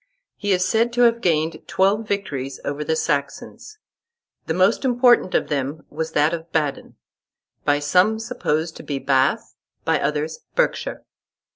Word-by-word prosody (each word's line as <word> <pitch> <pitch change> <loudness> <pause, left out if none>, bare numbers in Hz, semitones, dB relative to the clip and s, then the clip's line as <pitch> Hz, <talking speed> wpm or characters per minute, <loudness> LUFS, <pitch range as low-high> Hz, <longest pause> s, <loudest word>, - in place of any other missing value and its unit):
He 205 -1 -2
is 185 -1 +2
said 230 +3 +2
to 245 - +1
have 235 -1 +4
gained 160 -2 0
twelve 200 +3 +1
victories 140 -10 -3
over 145 +1 -3
the 160 +1 0
Saxons. 150 - -3 0.7
The 160 - 0
most 185 +8 +3
important 245 -6 +4
of - - +1
them 145 +1 -3
was 160 +1 -4
that 150 +3 +3
of 165 0 -6
Badon, 150 -3 -2 0.7
by 145 0 +3
some 180 +9 +3
supposed 165 -9 -2
to - - -10
be 140 - -3
Bath, 135 -1 +1 0.3
by - - +2
others 155 +2 -2 0.2
Berkshire. - - -1
160 Hz, 150 wpm, -22 LUFS, 150-215 Hz, 0.7 s, have